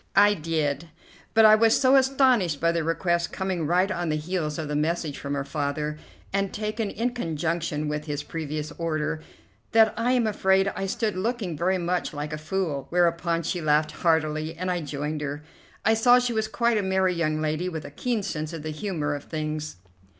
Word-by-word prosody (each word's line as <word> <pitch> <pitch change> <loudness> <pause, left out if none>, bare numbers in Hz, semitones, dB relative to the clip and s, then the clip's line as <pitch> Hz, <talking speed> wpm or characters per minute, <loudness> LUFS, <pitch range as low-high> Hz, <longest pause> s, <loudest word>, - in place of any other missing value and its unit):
I 205 +1 +7
did, 155 -2 -2 0.5
but 225 0 +7
I 215 - +9
was 225 +1 +5
so 260 0 +5
astonished 260 - +3
by 170 0 +3
the 170 -1 -1
request 170 +1 0
coming 185 -5 -2
right 180 +4 +2
on 175 -3 -2
the 155 - +1
heels 155 -1 -2
of 160 - -3
the 150 - -2
message 155 -1 -1
from 140 0 -3
her 140 - -1
father, 150 +1 -3 0.3
and 195 0 0
taken 215 0 -2
in 235 +5 -1
conjunction 165 -6 -2
with 150 0 -3
his 145 -1 -3
previous 155 -1 -4
order, 155 -1 -1 0.5
that 225 -1 +6
I 235 +3 +1
am 245 -2 +2
afraid 195 -2 +2
I 195 - -2
stood 220 0 -1
looking 200 -3 -2
very 185 +5 +1
much 175 -2 -2
like 150 +1 -4
a 155 - -4
fool, 155 -3 -2
whereupon 170 -1 +1
she 175 +2 -2
laughed 150 0 +2
heartily, 160 -1 0
and 185 +1 -2
I 175 -1 -1
joined 150 +1 -4
her. 145 0 -4 0.4
I 220 - +5
saw 245 +2 +6
she 250 -1 0
was 220 -1 0
quite 235 0 +1
a - - +1
merry 190 -1 +1
young 155 -3 0
lady, 155 +3 -1
with 160 -3 -6
a - - -8
keen 230 - -2
sense 155 -4 -4
of 160 -3 -6
the 155 - -3
humour 155 -3 -2
of 145 -1 -6
things. 155 -1 -4
170 Hz, 200 wpm, -26 LUFS, 155-195 Hz, 0.5 s, I